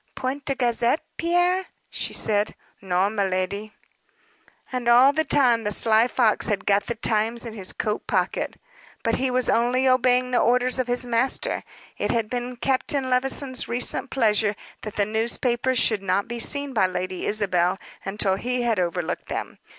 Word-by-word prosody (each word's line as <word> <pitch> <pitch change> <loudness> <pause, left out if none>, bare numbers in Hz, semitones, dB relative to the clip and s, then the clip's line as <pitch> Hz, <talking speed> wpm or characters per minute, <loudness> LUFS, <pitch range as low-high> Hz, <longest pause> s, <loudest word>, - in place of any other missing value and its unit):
"Point 265 +2 -4
de 275 - -1
gazette, 245 +3 +1
Pierre?" 355 +2 +1 0.2
she - - -1
said. 210 0 0 0.3
"Non, 190 +2 0
miladi." 200 +1 -2 1.0
And 250 -2 -1
all 255 +4 +6
the 315 - +1
time 250 -7 +3
the 210 - -1
sly 220 +2 +4
fox 235 -4 +1
had 205 -2 -2
got 200 0 +2
the 235 - -2
Times 225 +1 0
in 230 - -6
his 195 -4 +1
coat 210 0 -3
pocket. - - -1 0.4
But 230 - +1
he 265 0 0
was 250 0 0
only 245 +3 +2
obeying 255 0 +3
the 245 - +3
orders 250 +2 +2
of 255 - 0
his 245 +1 -1
master. 245 +2 0 0.4
It - - -1
had 225 -2 -1
been 245 0 -3
Captain 260 +1 -1
Levison's 260 0 0
recent 245 +3 -1
pleasure 215 -4 +1 0.3
that 215 - -7
the 205 - +1
newspapers 235 +3 0
should 220 -3 +3
not 195 +1 0
be 235 0 -5
seen 285 +3 -1
by 210 -5 +3
Lady 185 0 -4
Isabel 185 -4 +1 0.3
until 195 -1 0
he 250 +3 -2
had 230 -4 +1
over 175 0 -1
looked 170 +3 -5
them. - - -5
235 Hz, 170 wpm, -24 LUFS, 210-255 Hz, 1.0 s, all